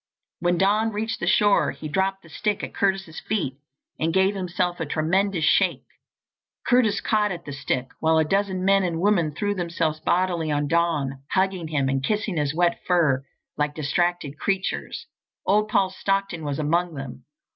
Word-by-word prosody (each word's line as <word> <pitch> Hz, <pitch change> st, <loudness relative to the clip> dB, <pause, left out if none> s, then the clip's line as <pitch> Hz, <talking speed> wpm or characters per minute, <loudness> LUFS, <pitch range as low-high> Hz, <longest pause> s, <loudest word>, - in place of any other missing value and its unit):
When 175 Hz, +1 st, +1 dB
Don 210 Hz, +4 st, +2 dB
reached 220 Hz, +2 st, -3 dB
the -, -, -3 dB
shore 205 Hz, -1 st, +4 dB
he 155 Hz, -, -6 dB
dropped 190 Hz, +5 st, -1 dB
the 165 Hz, -, -16 dB
stick 210 Hz, +3 st, -2 dB
at -, -, -5 dB
Curtis's 190 Hz, -4 st, -1 dB
feet 165 Hz, -11 st, -2 dB, 0.4 s
and 160 Hz, +1 st, +1 dB
gave 190 Hz, +3 st, +3 dB
himself 180 Hz, -2 st, -2 dB
a 165 Hz, -, -1 dB
tremendous 170 Hz, +3 st, +1 dB
shake. -, -, +2 dB, 0.8 s
Curtis 235 Hz, -5 st, +3 dB
caught 210 Hz, -2 st, +1 dB
at 170 Hz, -1 st, -6 dB
the 145 Hz, -, -6 dB
stick, 130 Hz, -1 st, -2 dB
while 160 Hz, 0 st, +3 dB
a 160 Hz, -, +3 dB
dozen 190 Hz, +1 st, 0 dB
men 195 Hz, 0 st, +5 dB
and 170 Hz, -3 st, -1 dB
women 175 Hz, -5 st, +2 dB
threw 205 Hz, +7 st, -1 dB
themselves 170 Hz, -4 st, -1 dB
bodily 175 Hz, -2 st, 0 dB
on 145 Hz, 0 st, 0 dB
Don, 150 Hz, -5 st, 0 dB
hugging 190 Hz, -3 st, +1 dB
him 150 Hz, -4 st, 0 dB
and 135 Hz, 0 st, 0 dB
kissing 210 Hz, 0 st, -1 dB
his 145 Hz, -1 st, 0 dB
wet 175 Hz, 0 st, +2 dB
fur 155 Hz, -7 st, +3 dB, 0.3 s
like 150 Hz, 0 st, -1 dB
distracted 155 Hz, -1 st, -1 dB
creatures. 195 Hz, -1 st, -2 dB, 0.4 s
Old 210 Hz, +2 st, +3 dB
Paul 195 Hz, -3 st, +2 dB
Stockton 195 Hz, -3 st, -1 dB
was 145 Hz, -2 st, -2 dB
among 165 Hz, +2 st, 0 dB
them. 130 Hz, -2 st, -8 dB
175 Hz, 170 wpm, -24 LUFS, 155-195 Hz, 0.8 s, men